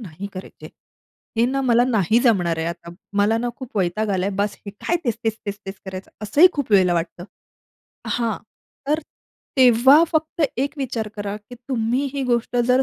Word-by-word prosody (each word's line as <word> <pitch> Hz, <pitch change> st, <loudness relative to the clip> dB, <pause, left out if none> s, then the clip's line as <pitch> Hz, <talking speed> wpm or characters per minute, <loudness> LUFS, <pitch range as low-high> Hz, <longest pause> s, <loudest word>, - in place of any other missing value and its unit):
नाही 190 Hz, -2 st, -7 dB
करायची 185 Hz, 0 st, -10 dB
आहे. -, -, -9 dB, 0.7 s
हे -, -, +5 dB
ना 270 Hz, +2 st, 0 dB
मला 240 Hz, -2 st, +4 dB
नाही 220 Hz, -2 st, +3 dB
जमणार 180 Hz, -9 st, +2 dB
आहे 160 Hz, -, -1 dB
आता. 170 Hz, 0 st, -6 dB, 0.3 s
मला 210 Hz, +2 st, +3 dB
ना 240 Hz, +1 st, -1 dB
खूप 260 Hz, -4 st, -9 dB
वैताग 195 Hz, +4 st, 0 dB
आलाय 190 Hz, 0 st, 0 dB
बास. 205 Hz, 0 st, 0 dB
हे -, -, -4 dB
काय 210 Hz, +12 st, -1 dB
तेच 235 Hz, -4 st, 0 dB
तेच 220 Hz, -1 st, 0 dB
तेच 205 Hz, 0 st, -4 dB
तेच 195 Hz, -, -5 dB
करायचं?" 190 Hz, 0 st, -7 dB
असंही 290 Hz, -, +6 dB
खूप 285 Hz, -6 st, -3 dB
वेळेला 185 Hz, -3 st, +5 dB
वाटतं 170 Hz, +1 st, -3 dB, 0.8 s
हां. 230 Hz, -4 st, 0 dB, 0.5 s
तर 305 Hz, +2 st, +2 dB, 0.6 s
तेव्हा 260 Hz, +4 st, +7 dB
फक्त 315 Hz, +1 st, 0 dB
एक 275 Hz, +4 st, -1 dB
विचार 235 Hz, -5 st, -2 dB
करा 205 Hz, 0 st, -4 dB
की 210 Hz, +4 st, -13 dB
तुम्ही 245 Hz, +1 st, 0 dB
ही 280 Hz, -, -1 dB
गोष्ट 240 Hz, -1 st, 0 dB
जर 255 Hz, +1 st, +5 dB
225 Hz, 185 wpm, -22 LUFS, 195-255 Hz, 0.8 s, तेव्हा